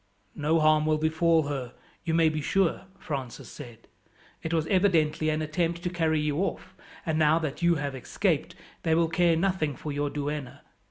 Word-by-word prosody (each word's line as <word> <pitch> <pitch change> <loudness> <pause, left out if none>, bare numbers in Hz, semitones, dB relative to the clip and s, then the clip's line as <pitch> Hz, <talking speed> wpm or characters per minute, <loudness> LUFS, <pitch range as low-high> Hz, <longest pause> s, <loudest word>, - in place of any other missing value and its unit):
"No 155 +2 +1
harm 155 0 +4
will 155 0 +3
befall 160 +1 +2
her, 135 -4 -4 0.3
you 165 -2 0
may 165 -1 +5
be 155 -1 -1
sure," 190 +4 +1
Francis 140 -10 -6
said. 120 -5 -11 0.5
"It 160 - -4
was 160 -2 +1
evidently 165 -5 +2
an 155 0 0
attempt 170 +2 -1
to 180 - -2
carry 160 -3 +1
you 150 -1 -1
off, 195 - -3 0.3
and 160 -2 0
now 155 +1 +4
that 155 -2 -3
you 170 0 +4
have 145 -2 -3
escaped 130 - -1 0.3
they 160 -1 +2
will 165 0 +2
care 170 0 +3
nothing 165 -5 0
for 150 - -6
your 145 0 -1
duenna. 145 -2 -4
155 Hz, 180 wpm, -27 LUFS, 150-165 Hz, 0.5 s, may